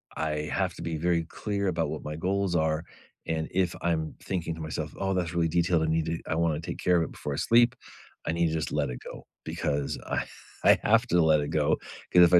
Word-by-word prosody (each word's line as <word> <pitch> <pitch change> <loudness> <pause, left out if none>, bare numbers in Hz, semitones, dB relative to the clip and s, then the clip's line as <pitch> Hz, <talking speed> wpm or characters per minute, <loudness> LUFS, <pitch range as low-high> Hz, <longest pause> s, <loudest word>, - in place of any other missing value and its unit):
I 75 -1 -2
have - - 0
to - - -9
be 80 -2 -2
very 85 0 +1
clear 100 +2 -2
about 85 -2 0
what - - -5
my 75 0 -4
goals 95 +1 0
are, 80 0 +1 0.4
and 80 -1 -1
if 90 -1 +1
I'm 80 -2 0
thinking 85 -3 -2
to 80 - -8
myself, 80 -1 -4
"Oh, 95 0 0
that's 90 -2 -1
really 85 -1 +2
detailed. 85 0 +2
I - - +2
need 80 0 +1
to 80 0 -2
I 80 - 0
wanna 80 -2 +1
take - - -5
care 90 -1 +3
of 85 - +3
it - - -5
before 75 - -5
I - - -3
sleep." 120 +2 +4 0.5
I 80 - +1
need 85 0 +2
to 80 - -2
just 80 - -2
let 70 - +1
it - - -5
go. - - -9 0.2
Because 70 -1 -1
I - - -1 0.4
I - - +7
have 115 +3 +4
to 85 -4 +4
let 80 -1 +5
it 75 - -3
go. - - +2 0.4
'Cause 90 - +8
if 85 +1 +5
I 90 - +10
85 Hz, 245 wpm, -28 LUFS, 80-90 Hz, 0.5 s, I